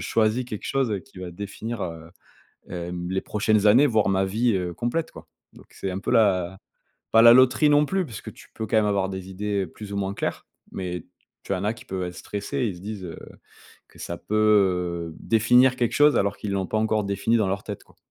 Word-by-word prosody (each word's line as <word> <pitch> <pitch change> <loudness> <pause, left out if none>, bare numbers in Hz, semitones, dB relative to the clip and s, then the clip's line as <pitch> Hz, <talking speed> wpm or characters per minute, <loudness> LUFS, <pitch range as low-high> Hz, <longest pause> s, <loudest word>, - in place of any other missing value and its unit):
choisis 115 +3 +1
quelque 110 -4 -7
chose 120 -8 0
qui 135 -8 -16
va 90 -1 -6
définir, 105 +4 -6
heu, 80 -1 -7 0.6
hem, 90 0 -5
les 95 0 0
prochaines 105 0 +1
années 125 +8 +6
voire 110 -4 +2
ma 95 0 +2
vie, 110 +5 +1
heu, 90 -2 -2
complète, 120 - -2
quoi». 80 0 -13 0.3
Donc - - -16
c'est 95 - -5
un 95 - -4
peu - - -3
la 95 -5 +2 0.5
pas 115 - +7
la 115 0 +10
loterie 130 +4 +5
non 145 0 +4
plus 190 +4 0
puisque 115 -9 -8
tu - - -16
peux 110 - -5
quand 110 - 0
même 110 - +4
avoir 100 -2 +1
des 95 0 -6
idées 100 0 -2
plus 100 +4 -10
ou - - -3
moins 100 0 -1
claires, - - -4 0.3
mais 90 -3 -5 0.4
tu 100 - -1
en 95 - -3
as 105 - +1
qui 110 -1 -13
peuvent 95 -1 -4
être 90 0 -4
stressés. 120 +6 -3
Ils 100 -5 -4
se - - -12
disent, 100 0 -6
heu, 85 - -7 0.7
que - - -20
ça 85 - -5
peut, 105 - -5 0.8
heu, - - -15
définir 125 +3 +4
quelque 120 -2 0
chose 145 0 +5
alors 100 0 +1
qu'ils 105 - -5
l'ont 95 -1 -1
pas 110 - -2
encore 110 -1 +1
défini 100 +4 +1
dans 105 -4 +1
leur 95 +1 -2
tête, - - -6
quoi. - - -25
105 Hz, 225 wpm, -24 LUFS, 95-115 Hz, 0.8 s, la